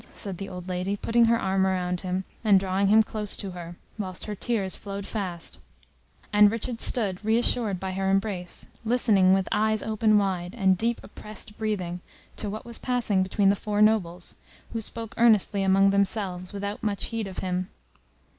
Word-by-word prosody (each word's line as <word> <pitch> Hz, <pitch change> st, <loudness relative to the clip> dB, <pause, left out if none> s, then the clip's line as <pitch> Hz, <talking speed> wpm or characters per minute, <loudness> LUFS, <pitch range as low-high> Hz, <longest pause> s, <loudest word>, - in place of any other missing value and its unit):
said 195 Hz, -4 st, -1 dB
the 195 Hz, 0 st, -5 dB
old 180 Hz, -1 st, -8 dB
lady, 185 Hz, +2 st, -2 dB
putting 235 Hz, +3 st, +3 dB
her 230 Hz, 0 st, +3 dB
arm 190 Hz, 0 st, +1 dB
round 180 Hz, -2 st, 0 dB
him, 185 Hz, 0 st, -2 dB, 0.2 s
and 205 Hz, -3 st, +6 dB
drawing 195 Hz, +1 st, 0 dB
him 220 Hz, +2 st, +6 dB
close 210 Hz, -1 st, -3 dB
to 195 Hz, -, -5 dB
her, 175 Hz, -1 st, -8 dB, 0.2 s
whilst 185 Hz, -3 st, -3 dB
her 210 Hz, -, -4 dB
tears 205 Hz, -3 st, -2 dB
flowed 200 Hz, -1 st, -6 dB
fast, 185 Hz, -7 st, -4 dB, 0.7 s
and 210 Hz, 0 st, +7 dB
Richard 230 Hz, +2 st, -3 dB
stood, 200 Hz, -5 st, +1 dB
reassured 220 Hz, -2 st, +1 dB
by 190 Hz, 0 st, -3 dB
her 190 Hz, +1 st, -1 dB
embrace, 195 Hz, -2 st, -1 dB, 0.2 s
listening 220 Hz, -5 st, +4 dB
with 190 Hz, 0 st, +2 dB
eyes 215 Hz, 0 st, +2 dB
open 215 Hz, -1 st, +3 dB
wide, 190 Hz, -1 st, -1 dB
and 190 Hz, -4 st, +3 dB
deep 230 Hz, +5 st, 0 dB
oppressed 210 Hz, 0 st, -7 dB
breathing, 185 Hz, -6 st, -3 dB, 0.3 s
to 210 Hz, -, -3 dB
what 215 Hz, +2 st, -6 dB
was 235 Hz, -1 st, -7 dB
passing 240 Hz, -6 st, +1 dB
between 195 Hz, +1 st, +2 dB
the 200 Hz, -, +4 dB
four 205 Hz, +1 st, -3 dB
nobles, 190 Hz, -5 st, +2 dB, 0.4 s
who 225 Hz, -, -2 dB
spoke 225 Hz, +1 st, -6 dB
earnestly 215 Hz, -3 st, +4 dB
among 195 Hz, +1 st, +4 dB
themselves, 195 Hz, -2 st, -1 dB
without 200 Hz, 0 st, -4 dB
much 205 Hz, -2 st, -1 dB
heed 225 Hz, -3 st, -2 dB
of 190 Hz, -, -9 dB
him. 180 Hz, +1 st, -2 dB
200 Hz, 175 wpm, -26 LUFS, 185-215 Hz, 0.7 s, and